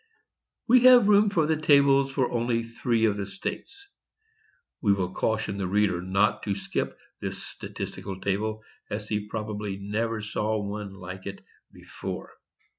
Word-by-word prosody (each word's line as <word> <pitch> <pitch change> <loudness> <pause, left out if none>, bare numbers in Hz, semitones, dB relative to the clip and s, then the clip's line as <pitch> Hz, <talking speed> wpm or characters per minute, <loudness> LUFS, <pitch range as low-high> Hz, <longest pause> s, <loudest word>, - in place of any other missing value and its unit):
"We 250 +2 +7
have 250 -4 +8
room 210 0 +6
for 170 -6 +2
the 155 0 0
tables 140 -2 +5
for 135 -2 0
only 120 -1 0
three 115 0 0
of 105 -2 +1
the 100 -1 -3
states." 400 - -6 0.9
[We 105 -4 +4
will 95 -2 -2
caution 110 -2 -1
the 95 - -1
reader 95 -2 +2
not 95 +3 +1
to 100 -2 0
skip 100 - -3 0.2
this - - -5
statistical 95 -1 -6
table, 110 +3 -2 0.3
as 105 +1 -4
he 105 -1 -2
probably 105 -2 -4
never 110 +3 -2
saw 105 +1 -1
one 100 -1 -5
like 95 0 -8
it 100 0 -8 0.3
before. - - -7
105 Hz, 150 wpm, -27 LUFS, 100-125 Hz, 0.9 s, have